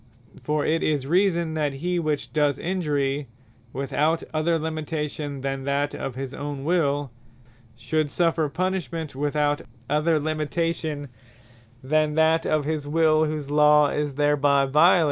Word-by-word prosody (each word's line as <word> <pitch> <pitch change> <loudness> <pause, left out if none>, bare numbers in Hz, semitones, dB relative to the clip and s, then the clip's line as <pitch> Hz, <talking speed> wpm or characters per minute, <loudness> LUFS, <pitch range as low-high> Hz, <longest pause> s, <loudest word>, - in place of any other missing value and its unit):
For 150 -1 -1
it 160 +1 +1
is 145 -4 0
reason, 170 0 +1
that 150 -3 -1
he 175 +6 -2
which 155 -3 -2
does 150 -2 +2
Injury, 145 -6 -1 0.4
without 150 +5 0
other 160 +2 +1
limitation 155 -2 -4
than 135 0 -3
that 140 +1 0
of 130 - -5
his 135 0 -5
own 145 -1 -5
Will, 145 -5 0 0.6
should 155 +5 -1
suffer 165 -2 +1
punishment 165 -3 -3
without 145 +1 0 0.3
other 155 +1 +2
limitation, 155 -1 -2 0.8
than 155 +2 +1
that 160 +1 +3
of 155 -2 +1
his 150 -1 -2
Will 155 0 +3
whose 150 -2 -4
Law 150 0 +5
is 145 -2 -2
thereby 145 -1 +3
violated. 155 +7 +5
150 Hz, 135 wpm, -24 LUFS, 145-160 Hz, 0.8 s, Law